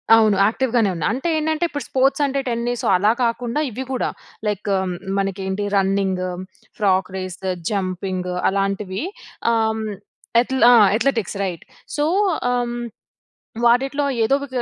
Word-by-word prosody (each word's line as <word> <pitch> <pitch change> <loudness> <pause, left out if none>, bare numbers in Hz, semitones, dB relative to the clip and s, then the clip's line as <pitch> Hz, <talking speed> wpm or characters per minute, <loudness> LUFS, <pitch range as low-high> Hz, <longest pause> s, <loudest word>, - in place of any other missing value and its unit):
అవును 215 -3 +4
యాక్టివ్‌ 235 +3 0
గానే 225 -5 +4
ఉన్నా. 160 - -1
అంటే 270 +7 -3
ఏంటంటే, 315 +2 0
ఇప్పుడు 290 -2 -4
స్పోర్ట్స్ 270 +2 +2
అంటే, 275 0 -1
టెన్నిస్ 235 +1 -2
అలా 205 +4 +4
కాకుండా, 235 +3 -1
ఇవి 250 +3 -5
కూడా 255 - 0 0.4
లైక్ 205 0 -2 0.5
మన 195 - +2 0.2
ఏంటి 190 +2 -2
రన్నింగు, 190 -2 +1 0.5
ఫ్రాగ్ 190 -3 +2
రేసు, 185 0 -5 0.2
జంపింగు 185 -2 -2
అలాంటివి 195 +2 -1 0.5
ఆహ్, 220 -1 +1 0.6
అథ్లె 260 0 0
ఆ! - - +8 0.2
Athletics 225 -5 0
right. 180 -4 -4 0.3
సో, 295 - +2 0.5
ఆహ్, 245 -1 -1 0.9
వాటిట్లో 270 +4 +3 0.2
ఏదో 270 +5 +3
వి - - -5
220 Hz, 130 wpm, -21 LUFS, 195-255 Hz, 0.9 s, ఆ